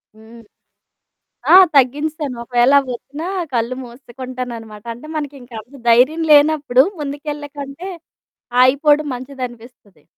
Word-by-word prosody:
హ్మ్. 225 +1 -15 1.1
ఆ! - - +9 0.2
తగ్గించేశాను. 290 +1 +1
ఒకవేళ 245 +2 +2
అవ్వొచ్చినా 275 +5 -7 0.3
కళ్ళు 235 +2 -1
మూసేసుకుంటాననమాట. 240 -3 -8
అంటే 245 +6 -13
మనకింక 280 -4 -6
అంత 245 +6 -19
ధైర్యం 260 +8 +4
లేనప్పుడు 290 -3 +5 0.2
ముందుకెళ్ళేకంటే 290 +2 -6 0.7
ఆగిపోవడం 290 +3 +3
మంచిదనిపిస్తది. 245 - -9
260 Hz, 90 wpm, -18 LUFS, 240-290 Hz, 1.1 s, ఆ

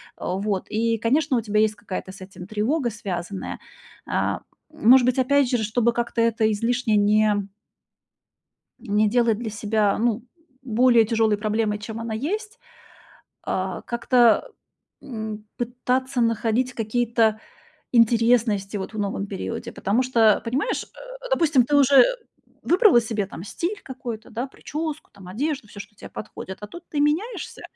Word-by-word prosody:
А 180 - -3
вот 200 -2 -2
и, 230 +1 0
конечно, 260 +4 +1
у - - 0
тебя 210 -1 0
есть 215 0 +2
какая-то 195 -2 -6
с 190 - -13
этим 185 -1 -10
тревога, 240 +6 0
связанная. 195 -3 -5 0.5
А, - - 0 0.3
может 260 -4 +5
быть, 255 +1 +1
опять 270 0 +3
через 230 -4 0
чтобы 235 +2 +1
как-то 235 0 -1
это 230 -1 +2
излишне 230 +1 0
не 210 +1 +3 1.4
Не 215 -2 +1
делать 235 -2 +2
для 230 -2 -4
себя, 210 -1 0
ну, 230 -1 0 0.4
более 235 -1 +4
тяжёлой 220 -1 +2
проблемой, 215 0 -1
чем 220 +1 -7
она 230 -1 -4
есть, 420 - -4 0.9
э, 185 0 -2
как-то, 240 - +3 0.5
м, 220 -4 -6
пытаться 250 +2 -1
находить 230 +2 +1
какие-то 225 -1 +1 0.5
интересности, 230 -3 +3
вот 190 +3 -6
в 215 - -5
новом 200 0 -2
периоде. 195 -2 -5
Потому 220 +6 0
что, 230 -4 +4
понимаешь, 250 +4 -1
э, - - -17 0.4
допустим, 315 - +4
ты 290 - +1
уже 275 -2 +7 0.6
выбрала 360 - +5
себе 220 -3 -2
там 185 -2 -9
стиль 350 - -4
какой-то, 245 -4 -7
да: 235 +2 -3
причёску, 305 +3 -6
там, 190 -2 -14
одежду, 270 +4 -3
всё, 205 - -12
что 210 - -10
тебе - - -11
подходит. 190 -2 -8
А 210 - -7
тут 345 +10 -11
ты 295 - -2
меняешься, 325 +12 -1
230 Hz, 145 wpm, -23 LUFS, 210-255 Hz, 1.4 s, уже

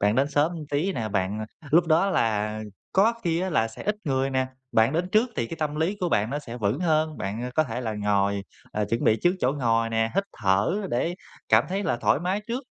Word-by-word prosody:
Bạn 105 +2 +3
đến 140 +2 +2
sớm 150 +5 +2 0.2
tí 160 +7 0
nè, 110 -7 -3
bạn, 95 +1 -1 0.2
ờ, 150 - -13
lúc 170 +2 +5
đó 170 +5 +3
là 110 - 0 0.3
có 215 +5 +4
khi 170 0 +1
á 190 - -1
là 115 -8 +2
sẽ 110 - -10
ít 210 0 0
người 135 -1 0
nè, 130 0 +1 0.3
bạn 110 +5 +4
đến 175 +3 0
trước 230 +3 +3
thì 115 - 0
cái 165 - -6
tâm 150 -1 -2
lý 170 +6 0
của 180 - +1
bạn 110 -4 +1
nó 145 - -1
sẽ 120 -4 -8
vững 110 - -1
hơn, 155 -2 +1
bạn, 105 +5 -3
à, 125 - -3
có 155 - +3
thể 125 -1 -4
là 110 -3 -2
ngồi, 100 -1 +1 0.3
ờ, 105 0 0
chuẩn 115 - -1
bị 110 - +4
trước 175 +1 +4
chỗ 130 +2 +2
ngồi 115 -4 +1
nè, 115 0 0
hít 200 - +2 0.2
thở 100 - +2 0.2
để 165 +9 0 0.3
cảm - - +5
thấy 195 +2 -1
là 120 - 0
thoải 120 - +2
mái 185 +4 -1
trước. 250 +4 -2
135 Hz, 250 wpm, -26 LUFS, 110-170 Hz, 0.3 s, lúc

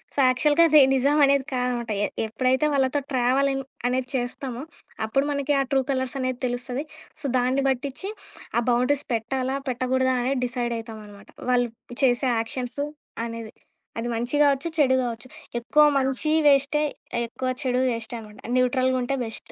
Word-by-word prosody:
So, - - -15
యాక్చువల్‌గా 295 +6 +4
అది 305 -1 +8
నిజం 280 +3 +3
అనేది 275 -1 +2
కాదనమాట. 250 -2 -1
ఎ - - 0 0.2
ఎప్పుడైతే 255 +6 +1
వాళ్ళతో 270 +1 +1
ట్రావెలింగ్ 270 +2 +1 0.2
అనేది 255 0 -1
చేస్తామో, 250 0 -3 0.4
అప్పుడు 275 +5 +1
మనకి 280 0 0
ఆ - - +2
ట్రూ 270 - +4
కలర్స్ 260 -1 -2
అనేది 255 -1 -2
తెలుస్తది. 245 +3 -3 0.4
సో, - - -7
దాన్ని 255 +2 +1
బట్టిచ్చి 275 +8 -3 0.5
ఆ 235 - +4
బౌండరీస్ 250 +4 +1
పెట్టాలా? 260 +4 -2
పెట్టకూడదా? 255 +1 +1
అని 265 - +1
డిసైడ్ 240 -1 -2
అయితాం 220 -1 -8
అనమాట. 200 -1 -15 0.2
వాళ్ళు 245 -1 +2 0.3
చేసే 255 0 +3
యాక్షన్సు 250 +4 -3 0.4
అనేది. 230 -1 -7 0.5
అది 235 - -3
మంచి 240 +4 -2
గావచ్చు, 285 +2 +3
చెడు 265 -4 +4
గావచ్చు. 235 -1 -4 0.3
ఎక్కువ 300 +6 +4
మంచీ 265 +3 0 0.2
వేస్టే, 280 +1 +4 0.5
ఎక్కువ 255 +2 -4
చెడూ 255 -2 0
వేస్టే 230 0 -5
అనమాట 210 -1 -13 0.2
న్యూట్రల్‌గా 255 +1 +2
ఉంటే 250 +3 -1
బెస్ట్. 225 -1 -7
255 Hz, 150 wpm, -25 LUFS, 240-275 Hz, 0.5 s, అది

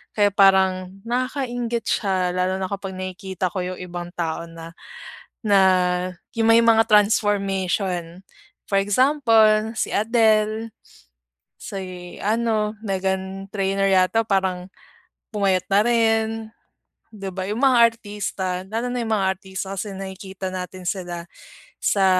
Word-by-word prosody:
Kaya 205 -1 +3
parang 190 -1 +3
nakakainggit 245 -1 -2
siya 185 -3 0
lalo 185 +1 0
na 190 - -2
kapag 195 -1 -5
nakikita 185 -1 -4
ko 185 -1 -3
yung - - -14
ibang 175 -1 -6
tao 170 0 -3
na, 165 0 -10 0.7
na 205 -2 +4 0.8
yung 225 0 +2
may 230 - +5
mga 225 -1 +4
transformation. 195 -4 +1 0.4
For 195 - +2
example 220 -1 +3
si - - -2
Adele, 220 0 +2 0.9
si 185 -4 -7
ano 215 -1 0
Meghan 190 -1 -3
Trainor 195 -1 0
yata 190 +4 +3
parang 190 -3 -1 0.6
pumayat 190 -3 +1
na 195 +1 +5
rin, 225 -2 +2 0.9
'di 195 -2 -7
ba? 185 0 -4
Yung 215 - -2
mga 265 -2 +5 0.2
artista 200 -4 -4
lalo 230 +3 -2
na 245 -1 -2
yung 225 - -4
mga 195 -1 +1
artista 190 0 -6
kasi 205 +2 -4
nakikita 190 0 -7
natin 185 0 -6
sila 175 -3 -4 0.6
sa 195 -2 +2
195 Hz, 125 wpm, -22 LUFS, 185-220 Hz, 0.9 s, may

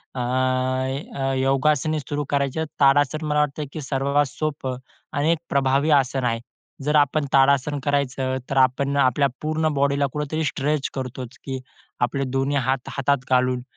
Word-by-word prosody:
अ, - - -3
अ, 130 +2 -1
योगासने 140 +3 +2
सुरू 145 +1 -3
करायची 140 +1 0
आहेत, 160 - -1
ताडासन 145 +2 +3
मला 150 0 +1
वाटतं 150 0 0
की 155 - -5
सर्वात 140 +1 +1
सोपं 135 -2 -3 0.4
आणि 150 +3 +2
एक 170 - +2
प्रभावी 140 +2 +2
आसन 130 0 -3
आहे. 115 -1 0 0.4
जर 150 +2 +1
आपण 145 +1 +2
ताडासन 140 +1 +3
करायचं, 135 -2 0
तर 135 - -1
आपण 135 +2 +2
आपल्या 140 +1 +3
पूर्ण 155 +1 0
बॉडीला 140 0 +2
कुठेतरी 150 +2 -2
स्ट्रेच 145 0 -1
करतोच 130 -1 -6
की 135 -1 -4 0.4
आपले 130 +3 0
दोन्ही 135 +2 0
हात 130 -1 -1
हातात 140 +1 +1
घालून 125 -1 +2
140 Hz, 155 wpm, -23 LUFS, 130-145 Hz, 0.4 s, ताडासन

